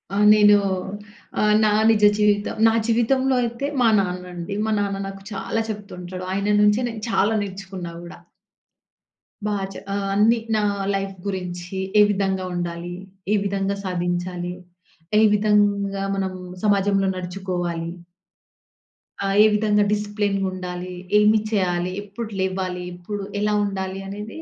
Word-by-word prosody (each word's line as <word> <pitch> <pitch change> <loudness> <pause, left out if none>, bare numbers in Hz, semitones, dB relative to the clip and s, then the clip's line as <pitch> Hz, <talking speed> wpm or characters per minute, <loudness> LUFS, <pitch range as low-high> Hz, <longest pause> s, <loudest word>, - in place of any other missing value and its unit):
ఆహ్, 205 - +3
నేను 205 -1 +7 0.9
ఆహ్ 210 0 +4
నా 210 - +3 0.2
నిజ 210 -2 +5
జీవితం 205 0 +2
నా 225 - +4
జీవితంలో 260 +3 +2
అయితే 235 +4 -2
మా 230 - +5
నాన్నండి, 180 0 -4
మా - - 0
నాన్న 200 -1 -1
నాకు 195 0 -8
చాలా 225 +3 -2
చెప్తుంటాడు, 185 -3 -6
ఆయన 200 +2 +1
నుంచే 210 +2 +4
నేను 225 -2 -7
చాలా 215 +3 +2
నేర్చుకున్నా 190 -3 -7
గూడా. 175 0 -10 1.3
బా - - 0 0.2
చె - - -8
ఆహ్ 200 -1 -1
అన్ని 220 +4 +4 0.2
నా 215 - +2 0.3
లైఫ్ 195 0 -2
గురించి 180 -1 -4 0.2
ఏ - - +9
విధంగా 190 -2 0
ఉండాలి? 175 0 -4 0.4
ఏ - - +4
విధంగా 195 0 -1
సాధించాలి? 175 -1 -2 0.7
ఏ - - +5
విధంగా 205 -1 +2
మనం 190 -1 -2 0.3
సమాజంలో 200 -1 +2
నడుచుకోవాలి? 180 -2 -3 1.4
ఆహ్, 195 0 0
ఏ - - +7
విధంగా 210 -1 +3
డిసి‌ప్లెన్‌గుండాలి? 195 -4 -2 0.3
ఏమి 215 +1 +5
చేయాలి? 180 -3 0
ఎప్పుడు 210 +3 -7
లేవ్వాలి? 185 -1 -2
ఎప్పుడు 195 +3 -6 0.2
ఎలా 210 0 +1
ఉండాలి? 190 -1 -3
అనేది 210 +7 -7
195 Hz, 130 wpm, -23 LUFS, 185-210 Hz, 1.4 s, ఏ